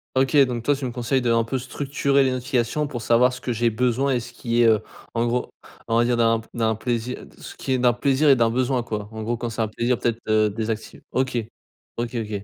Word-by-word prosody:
OK, 135 +3 +3
donc 120 -2 -3
toi 145 +4 +2
tu 135 -1 -5
me 125 - -3
conseilles 125 +2 0
d'un 115 -1 +3
peu 130 +4 -2
structurer 140 +2 0
les 130 - +2
notifications 130 +2 -1
pour 130 -5 -5
savoir 120 +2 +3
ce 125 - -8
que 125 - -2
j'ai 115 0 +1
besoin, 125 +4 +1
et 125 - +1
ce 120 +1 -9
qui 120 -1 0
est 115 - +6
heu, 110 -2 +5 0.4
en 115 0 +1
gros, 120 +1 -1 0.4
on 115 - +1
va 120 - +4
dire 120 -1 +1
d'un 115 -1 +3
p 115 - -14
d'un 110 -1 +1
plaisi 120 +2 -2 0.2
ce - - -10
qui - - -5
est 130 - +2
d'un 125 -1 +4
plaisir 140 +3 +2
et 135 - +8
d'un 115 -2 +2
besoin 125 0 0
quoi? 105 -2 -5
En 110 0 -6
gros, 120 +1 -1
quand 120 0 -3
c'est 115 0 -2
un 110 - -1
plaisir 120 +3 0
peut-être 115 -1 -1
heu, 110 -1 +3
désacti 110 +1 -4
OK. 130 -1 0 0.6
OK, 120 +1 -3
OK. 105 -3 -3
120 Hz, 250 wpm, -23 LUFS, 115-130 Hz, 0.6 s, et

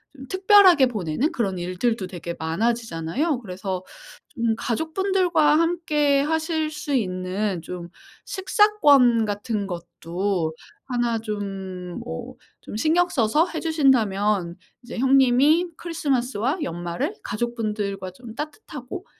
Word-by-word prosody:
좀 265 -1 -11
특별하게 375 -7 +6
보내는 215 - -1
그런 200 - -1
일들도 185 +4 -1
되게 170 -1 -6
많아지잖아요. 225 - -1
그래서 185 -2 -5 0.5
좀 230 -4 -1
가족분들과 320 - +1
함께 305 -4 +2
하실 315 0 -1
수 295 -1 -4
있는 185 -3 -1
좀 175 0 -7 0.4
식사권 295 - +4
같은 205 0 -2
것도 175 0 -3 0.3
1 240 -3 0
좀 195 -4 -5
뭐 80 0 -6 0.3
좀 - - -8
신경 335 +8 +3
써서 300 +4 +2
해 320 - -5
주신다면 210 - +2 0.3
이제 240 - -8
형님이 270 +6 +4
크리스마스와 270 - -1
연말을 175 - -3
가족분들과 210 -4 -3
좀 225 +3 -11
따뜻하고 300 - -7
240 Hz, 255 characters per minute, -24 LUFS, 190-305 Hz, 0.5 s, 특별하게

